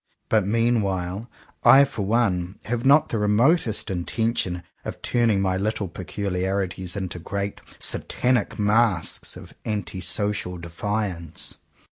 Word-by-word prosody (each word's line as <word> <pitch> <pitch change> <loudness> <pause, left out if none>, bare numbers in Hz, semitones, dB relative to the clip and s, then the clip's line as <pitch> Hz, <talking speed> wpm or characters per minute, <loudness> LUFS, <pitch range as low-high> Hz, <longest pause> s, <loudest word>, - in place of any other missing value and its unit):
But 105 -3 +3
meanwhile, 105 -3 0 0.3
I 135 +1 +9
for 140 -6 -3
one, 95 -4 +1
have 120 0 -2
not 140 +3 +5
the 115 - -1
re 105 - +1
motest 115 - +2
intention 90 -1 -1 0.2
of - - -6
turning 115 -5 +2
my 95 -1 +1
little 105 0 -1
peculi 90 +1 -4
arities 95 -1 -2
into 95 -2 -3
great 100 +3 -4 0.2
Satanic 125 -1 0
masks 105 -4 +1
of - - -12
anti 95 -4 -3
social 95 0 0
defiance. 85 -1 -3
100 Hz, 125 wpm, -24 LUFS, 90-115 Hz, 0.3 s, I